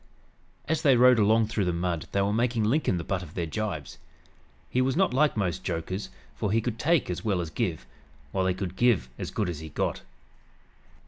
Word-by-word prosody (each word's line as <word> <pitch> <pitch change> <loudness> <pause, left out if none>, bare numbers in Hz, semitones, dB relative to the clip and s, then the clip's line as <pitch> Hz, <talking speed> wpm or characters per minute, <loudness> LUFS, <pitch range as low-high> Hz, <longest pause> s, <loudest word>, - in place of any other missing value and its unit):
As 160 0 0
they 140 -5 +5
rode 125 -1 +6
along 110 +2 +4
through 110 -2 -1
the 90 - +1
mud 85 -1 -2
they 100 - +1
were 100 +1 0
making 115 0 +1
Lincoln 110 - +1
the 85 - -3
butt 95 +2 -2
of 80 -3 -11
their 85 - -1
gibes. 80 -4 -4 0.7
He 130 - +1
was 130 0 +1
not 190 -5 +2
like 150 -1 +3
most 90 -5 -1
jokers, 90 +3 -3 0.3
for 105 - -2
he 115 - +3
could 115 0 -3
take 165 -1 +2
as 90 - -4
well 100 -5 +1
as 85 -3 -4
give, 90 - -2 0.5
while 95 +2 0
he 90 - +1
could 95 -1 -4
"give 115 - +2
as - - -4
good 105 - -1
as 85 -4 -4
he 80 0 -8
got." - - -2
100 Hz, 210 wpm, -27 LUFS, 90-120 Hz, 0.7 s, rode